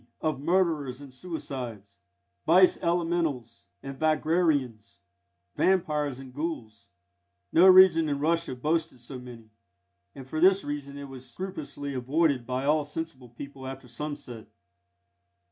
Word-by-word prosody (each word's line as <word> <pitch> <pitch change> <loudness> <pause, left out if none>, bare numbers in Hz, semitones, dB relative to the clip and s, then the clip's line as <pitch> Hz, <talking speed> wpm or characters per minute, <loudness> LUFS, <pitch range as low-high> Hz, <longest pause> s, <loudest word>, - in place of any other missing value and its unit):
_ - - -28 0.2
(of 155 -4 -1
murderers 155 -6 +1
and 140 -2 -12
suicides) 130 - -7 0.5
Vice 180 +3 +5
Elementals 165 -9 -1 0.2
and 135 0 -7
Vagrarians, 155 - +1 0.6
vampires 150 -7 +1
and 130 -1 -11
ghouls; 125 -8 -5 0.6
no 180 +3 +7
region 185 -4 +7
in 145 - 0
Russia 165 -2 0
boasted 155 +1 -1
so 125 +2 -8
many, 120 -3 -12 0.6
and 135 -1 -10
for 155 +3 -3
this 190 +3 +5
reason 145 -1 -5
it 140 - -7
was 130 -2 -10
scrupulously 150 -3 -6
avoided 135 0 +1
by 130 +1 -2
all 150 +1 +3
sensible 145 -4 -6
people 135 +2 -9
after 135 -1 -8
sunset. 125 -3 -7
145 Hz, 130 wpm, -27 LUFS, 130-165 Hz, 0.6 s, no